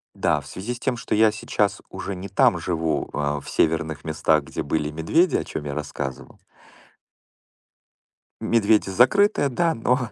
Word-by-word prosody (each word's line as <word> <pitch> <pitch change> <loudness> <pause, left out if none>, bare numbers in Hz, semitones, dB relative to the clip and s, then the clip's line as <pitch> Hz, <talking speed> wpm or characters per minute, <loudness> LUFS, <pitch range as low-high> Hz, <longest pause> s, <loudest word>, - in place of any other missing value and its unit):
Да, - - +1
в - - -13
связи 105 +6 -5
с 120 - -9
тем, 130 - -1
что 115 - -4
я 110 +1 +5
сейчас 105 -1 -1
уже 100 - -5
не 95 +2 -7
там 95 -1 +3
живу, 80 -3 -2
э, 75 0 -1
в - - -9
северных 80 -1 0
местах, 80 -1 +1
где - - -4
были 75 0 -1
медведи, 80 - +2
о - - +1
чем 75 - -6
я 70 - -4
рассказывал. 70 -3 -6 2.0
Медведи 110 -3 +2
закрытые, 145 - +3
да, 165 +5 +1
но. 125 +1 0
95 Hz, 160 wpm, -23 LUFS, 80-120 Hz, 2.0 s, я